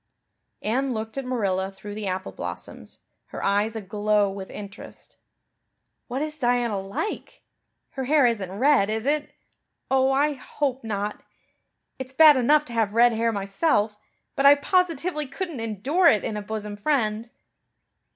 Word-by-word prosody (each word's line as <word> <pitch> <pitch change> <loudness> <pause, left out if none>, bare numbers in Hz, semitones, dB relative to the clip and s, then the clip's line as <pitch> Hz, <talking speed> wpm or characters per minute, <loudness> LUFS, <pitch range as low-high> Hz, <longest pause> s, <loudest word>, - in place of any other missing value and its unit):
Anne 255 +4 0
looked 220 0 -5
at 275 -1 -4
Marilla 195 -6 -1
through 200 +2 -9
the 210 -1 -5
apple 190 +1 -3
blossoms, - - -8 0.3
her - - -7
eyes 205 +3 +1
aglow 210 -1 0
with 195 -1 -7
interest. 200 -1 -11 0.9
"What 265 +4 -2
is 305 0 -5
Diana 240 -5 +1
like? 200 - -5 0.5
Her 265 -1 -4
hair 290 0 +4
isn't 205 -6 0
red, 260 -5 +4
is 220 +2 -2
it? 295 +1 0 0.6
Oh, 265 0 +4
I 290 +2 +2
hope 270 -1 -3
not. 210 -1 -3 0.8
It's 260 0 -7
bad 305 +1 +8
enough 295 +4 +3
to 240 - -10
have 220 -2 0
red 240 0 +5
hair 230 +1 +1
myself, 205 +2 0 0.4
but 275 - 0
I 285 - +9
positively 330 -1 0
couldn't 335 -1 -5
endure 230 - +1
it 215 -10 +4
in 215 - -3
a 210 - -3
bosom 210 0 -5
friend." 225 -2 0
230 Hz, 150 wpm, -25 LUFS, 205-280 Hz, 0.9 s, I